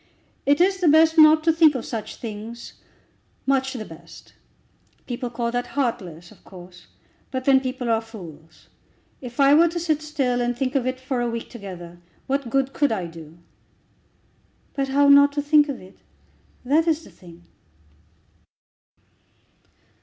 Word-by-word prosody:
It 285 Hz, +2 st, +3 dB
is 380 Hz, +2 st, +2 dB
the 360 Hz, -, +1 dB
best 320 Hz, +1 st, +5 dB
not 310 Hz, 0 st, +7 dB
to 325 Hz, 0 st, +3 dB
think 315 Hz, -3 st, +4 dB
of 250 Hz, -, -4 dB
such 225 Hz, -3 st, -6 dB
things, 225 Hz, +1 st, -8 dB, 0.7 s
much 265 Hz, -1 st, 0 dB
the 225 Hz, -4 st, -6 dB
best. 165 Hz, -1 st, -14 dB, 0.7 s
People 245 Hz, 0 st, -5 dB
call 235 Hz, 0 st, -3 dB
that 245 Hz, 0 st, -2 dB
heartless, 180 Hz, -, -3 dB
of -, -, -20 dB
course, 180 Hz, -1 st, -14 dB, 0.4 s
but 260 Hz, -1 st, -4 dB
then 270 Hz, -1 st, +5 dB
people 255 Hz, -1 st, -5 dB
are 225 Hz, -1 st, +1 dB
fools. 165 Hz, -8 st, -13 dB, 0.5 s
If 245 Hz, -1 st, -10 dB
I 275 Hz, 0 st, +6 dB
were 330 Hz, +3 st, +6 dB
to 340 Hz, +1 st, -3 dB
sit 315 Hz, -3 st, -1 dB
still, 270 Hz, -5 st, -1 dB
and 245 Hz, 0 st, -1 dB
think 260 Hz, 0 st, -2 dB
of 265 Hz, -3 st, 0 dB
it 255 Hz, 0 st, -3 dB
for 260 Hz, -1 st, -3 dB
a 240 Hz, -, -1 dB
week 230 Hz, 0 st, -6 dB
together, 180 Hz, -6 st, -10 dB, 0.3 s
what 275 Hz, -2 st, -2 dB
good 270 Hz, +2 st, 0 dB
could 290 Hz, -3 st, +1 dB
I 190 Hz, -5 st, -2 dB
do?" 165 Hz, -1 st, -12 dB, 1.4 s
"But 275 Hz, -1 st, -2 dB
how 280 Hz, +1 st, +3 dB
not 285 Hz, 0 st, +6 dB
to 290 Hz, -, -1 dB
think 295 Hz, 0 st, +4 dB
of 275 Hz, -, -4 dB
it? 185 Hz, -, -16 dB, 0.7 s
that 310 Hz, +6 st, +2 dB
is 320 Hz, 0 st, +1 dB
the -, -, -15 dB
thing." 175 Hz, -2 st, -16 dB
255 Hz, 160 wpm, -23 LUFS, 220-285 Hz, 1.4 s, not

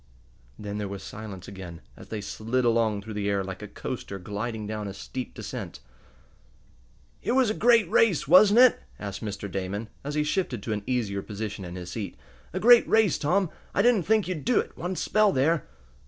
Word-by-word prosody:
Then 105 Hz, 0 st, -5 dB
there 105 Hz, -, -2 dB
was 100 Hz, 0 st, -7 dB
silence 100 Hz, -2 st, -8 dB
again, 95 Hz, -4 st, -8 dB, 0.2 s
as -, -, -13 dB
they 110 Hz, -2 st, -4 dB
slid 115 Hz, +5 st, -2 dB
along 115 Hz, -3 st, +2 dB
through 110 Hz, -, -7 dB
the 100 Hz, -1 st, -1 dB
air 100 Hz, -1 st, +1 dB
like 95 Hz, +1 st, -7 dB
a 105 Hz, -, -6 dB
coaster 100 Hz, -1 st, -6 dB
gliding 105 Hz, +4 st, -4 dB
down 105 Hz, 0 st, -4 dB
a 100 Hz, -, -6 dB
steep 125 Hz, +6 st, -6 dB
descent. -, -, -6 dB, 1.4 s
"It -, -, 0 dB
was 255 Hz, -4 st, +3 dB
a -, -, 0 dB
great 230 Hz, -1 st, +4 dB
race, 200 Hz, -12 st, +3 dB
wasn't 200 Hz, -, +7 dB
it?" 255 Hz, -2 st, +6 dB, 0.2 s
asked 100 Hz, 0 st, -6 dB
Mr. 105 Hz, -1 st, -5 dB
Damon, 100 Hz, +3 st, -4 dB
as 145 Hz, +1 st, -4 dB
he 150 Hz, -, +2 dB
shifted 150 Hz, -, -1 dB
to 110 Hz, -, -2 dB
an 105 Hz, -, -3 dB
easier 110 Hz, -6 st, -1 dB
position 105 Hz, -1 st, -5 dB
in 90 Hz, 0 st, -7 dB
his 90 Hz, -1 st, -7 dB
seat. 105 Hz, +1 st, -5 dB, 0.3 s
"A 185 Hz, -, -3 dB
great 240 Hz, +3 st, +7 dB
race, 220 Hz, -6 st, +4 dB
Tom. 180 Hz, +4 st, +1 dB, 0.2 s
I 200 Hz, -, +3 dB
didn't 230 Hz, -8 st, +3 dB
think 220 Hz, -3 st, +3 dB
you'd 180 Hz, -5 st, -3 dB
do 245 Hz, -2 st, +3 dB
it, -, -, -4 dB
one 180 Hz, +2 st, -4 dB
spell 215 Hz, +2 st, +3 dB
there." 145 Hz, +4 st, +1 dB
110 Hz, 200 wpm, -27 LUFS, -, 1.4 s, wasn't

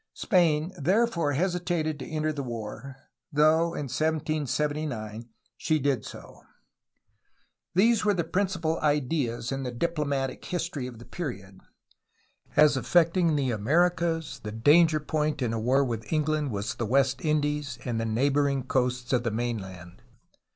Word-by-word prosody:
Spain 170 Hz, -4 st, +2 dB
therefore 180 Hz, -2 st, +1 dB
hesitated 170 Hz, -2 st, -1 dB
to 130 Hz, -, -7 dB
enter 155 Hz, 0 st, -1 dB
the 145 Hz, -, -4 dB
war, 120 Hz, +2 st, -6 dB, 0.4 s
though 160 Hz, +3 st, +3 dB
in -, -, -3 dB
1779 145 Hz, -6 st, -2 dB, 0.3 s
she 155 Hz, -, +1 dB
did 140 Hz, -6 st, 0 dB
so. -, -, -11 dB, 1.3 s
These 225 Hz, +4 st, +4 dB
were 205 Hz, -1 st, +2 dB
the 170 Hz, -, 0 dB
principal 180 Hz, -2 st, -1 dB
ideas 140 Hz, -5 st, 0 dB
in 135 Hz, 0 st, -2 dB
the 130 Hz, -, -3 dB
diplomatic 140 Hz, -1 st, -2 dB
history 165 Hz, -7 st, -3 dB
of 120 Hz, -2 st, -9 dB
the 120 Hz, -, -12 dB
period. 100 Hz, -, -6 dB, 1.0 s
As 150 Hz, -1 st, +6 dB
affecting 170 Hz, +3 st, +3 dB
the 135 Hz, -3 st, 0 dB
Americas 165 Hz, +7 st, +1 dB
the 105 Hz, -, -5 dB
danger 155 Hz, +8 st, +4 dB
point 150 Hz, 0 st, -1 dB
in 120 Hz, -4 st, -1 dB
a 115 Hz, -, -1 dB
war 130 Hz, +5 st, +2 dB
with 115 Hz, -3 st, -5 dB
England 155 Hz, -2 st, 0 dB
was 105 Hz, -2 st, -3 dB
the 115 Hz, -, -3 dB
West 130 Hz, +1 st, +2 dB
Indies 150 Hz, -3 st, 0 dB
and 115 Hz, -2 st, -1 dB
the -, -, -2 dB
neighboring 140 Hz, +4 st, +1 dB
coasts 125 Hz, 0 st, -1 dB
of 125 Hz, -, +3 dB
the 120 Hz, -, -1 dB
mainland. 100 Hz, -6 st, -5 dB
145 Hz, 140 wpm, -27 LUFS, 125-160 Hz, 1.3 s, As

